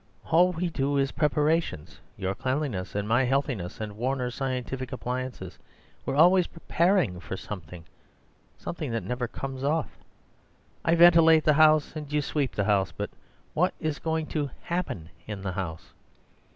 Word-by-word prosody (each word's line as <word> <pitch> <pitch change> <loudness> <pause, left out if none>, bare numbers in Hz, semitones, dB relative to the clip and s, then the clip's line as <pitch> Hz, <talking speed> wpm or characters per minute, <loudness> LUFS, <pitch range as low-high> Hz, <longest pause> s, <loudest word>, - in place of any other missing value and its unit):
All 175 +3 +5
we 175 0 -2
do 140 -1 0
is 135 0 +1
preparations—your 150 - -1
cleanliness, 130 -5 -2
and 100 0 -1
my 120 +4 +3
healthiness, 125 -8 -1
and 105 -2 -5
Warner's 125 +1 -1
scientific 130 -1 -3
appliances. 125 -7 -5 0.5
We're - - 0
always 180 +4 +6
preparing 170 - +1
for 95 +1 -6
something—something 95 - -9
that 115 -3 -1
never 125 +5 -2
comes 135 +2 -6
off. 150 +2 -1 0.8
I 165 - +3
ventilate 165 -2 +7
the 150 - +4
house, 155 0 +4
and 150 -2 -6
you 150 0 +1
sweep 140 -2 -1
the 100 - +1
house; 100 -2 +2
but - - -5 0.4
what 180 +4 +1
is 155 -4 -2
going 160 -1 -1
to 145 -3 -1
HAPPEN 165 - -3 0.2
in 105 -3 -6
the 95 - -2
house?" 90 -4 -5
135 Hz, 145 wpm, -27 LUFS, 105-155 Hz, 0.8 s, ventilate